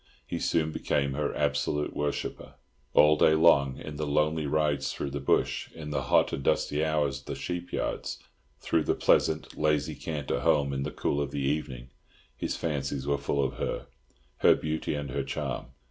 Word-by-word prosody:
He -, -, -4 dB
soon 80 Hz, -1 st, +1 dB
became 70 Hz, -2 st, 0 dB
her 70 Hz, +1 st, -1 dB
absolute 75 Hz, 0 st, 0 dB
worshipper. 75 Hz, 0 st, -3 dB, 0.4 s
All 75 Hz, +1 st, +7 dB
day 80 Hz, +1 st, +5 dB
long, 70 Hz, -5 st, +5 dB
in 75 Hz, -1 st, -7 dB
the 75 Hz, 0 st, -2 dB
lonely 75 Hz, +1 st, +1 dB
rides 75 Hz, -1 st, +1 dB
through 70 Hz, -, -4 dB
the 70 Hz, -, -3 dB
bush, 70 Hz, -, +1 dB
in 75 Hz, -2 st, -7 dB
the 75 Hz, -, 0 dB
hot -, -, +3 dB
and -, -, -2 dB
dusty 75 Hz, +3 st, +1 dB
hours 75 Hz, -3 st, 0 dB
at 70 Hz, -, -21 dB
the -, -, -3 dB
sheep 90 Hz, 0 st, -4 dB
yards, -, -, -2 dB, 0.4 s
through -, -, +1 dB
the -, -, +2 dB
pleasant, 80 Hz, 0 st, +2 dB
lazy 75 Hz, -1 st, +1 dB
canter 75 Hz, -4 st, -3 dB
home 70 Hz, -1 st, +2 dB
in 70 Hz, -, -2 dB
the -, -, -2 dB
cool 70 Hz, -, -1 dB
of 70 Hz, -, -2 dB
the 70 Hz, -, -4 dB
evening, 65 Hz, -3 st, -2 dB, 0.4 s
his -, -, -3 dB
fancies 70 Hz, -3 st, -2 dB
were 70 Hz, 0 st, +1 dB
full 70 Hz, 0 st, 0 dB
of 65 Hz, 0 st, -2 dB
her—her -, -, -1 dB
beauty 80 Hz, -1 st, -2 dB
and 70 Hz, -2 st, -4 dB
her -, -, -1 dB
charm. -, -, -4 dB
75 Hz, 180 wpm, -28 LUFS, 70-75 Hz, 0.4 s, All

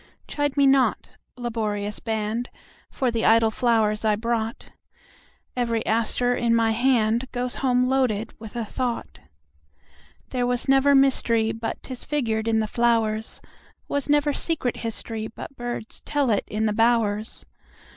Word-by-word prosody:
Chide 290 Hz, -1 st, -2 dB
me 280 Hz, -, +5 dB
not, 270 Hz, -1 st, +3 dB, 0.3 s
laborious 210 Hz, -4 st, -2 dB
band, 220 Hz, +2 st, -2 dB, 0.4 s
For 255 Hz, -2 st, -1 dB
the 230 Hz, -1 st, -1 dB
idle 225 Hz, 0 st, +5 dB
flowers 220 Hz, -3 st, +1 dB
I 215 Hz, -1 st, +3 dB
brought; 225 Hz, +1 st, -3 dB, 0.8 s
Every 235 Hz, -2 st, -1 dB
aster 230 Hz, +2 st, +1 dB
in 235 Hz, -1 st, +2 dB
my 225 Hz, -1 st, +3 dB
handGoes 245 Hz, +1 st, +1 dB
home 250 Hz, -2 st, +2 dB
loaded 255 Hz, -5 st, 0 dB
with 220 Hz, -1 st, -10 dB
a 235 Hz, -2 st, -2 dB
thought. 235 Hz, -, -4 dB, 1.1 s
There 245 Hz, -2 st, -1 dB
was 245 Hz, 0 st, -2 dB
never 270 Hz, +1 st, +5 dB
mysteryBut 230 Hz, -4 st, +1 dB
'tis 255 Hz, -2 st, -7 dB
figured 230 Hz, -7 st, -1 dB
in 220 Hz, -1 st, +2 dB
the -, -, 0 dB
flowers; 225 Hz, -1 st, 0 dB, 0.5 s
SWas 285 Hz, 0 st, -2 dB
never 295 Hz, 0 st, +3 dB
secret 295 Hz, -8 st, -1 dB
historyBut 225 Hz, +2 st, -5 dB
birds 240 Hz, -2 st, -6 dB
tell 285 Hz, -4 st, 0 dB
it 205 Hz, -, +1 dB
in 215 Hz, +1 st, -1 dB
the 215 Hz, -, +1 dB
bowers. 225 Hz, -1 st, +1 dB
230 Hz, 135 wpm, -24 LUFS, 220-255 Hz, 1.1 s, me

